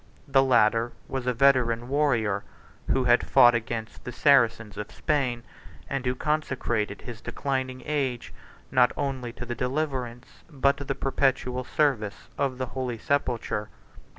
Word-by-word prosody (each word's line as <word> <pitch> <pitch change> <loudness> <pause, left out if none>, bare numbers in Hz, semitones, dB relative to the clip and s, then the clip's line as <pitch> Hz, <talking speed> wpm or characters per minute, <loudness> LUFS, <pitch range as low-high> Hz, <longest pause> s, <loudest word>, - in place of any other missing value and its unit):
The 135 -1 +4
latter 115 -2 +3
was 130 -2 -4
a - - +3
veteran 120 -2 +3
warrior, 120 -8 +1 0.5
who - - +2
had - - +3
fought 120 0 +7
against 115 -1 -4
the 125 - -6
Saracens 115 -5 +3
of 105 0 -6
Spain, 125 -5 -1 0.4
and 135 -2 -3
who 125 - +1
consecrated 120 -8 -1
his 115 -2 -8
declining 130 -2 -3
age, 135 -5 -2 0.4
not 125 -1 +4
only 130 -4 -3
to 125 - -7
the 120 - -4
deliverance, 125 -2 -3
but 140 -2 +2
to 140 - -6
the 135 0 -3
perpetual 130 -2 0
service, 125 -8 -1
of 135 -3 -1
the 130 - -2
holy 125 -3 -3
sepulchre. 115 -5 -1
125 Hz, 145 wpm, -26 LUFS, 115-135 Hz, 0.5 s, fought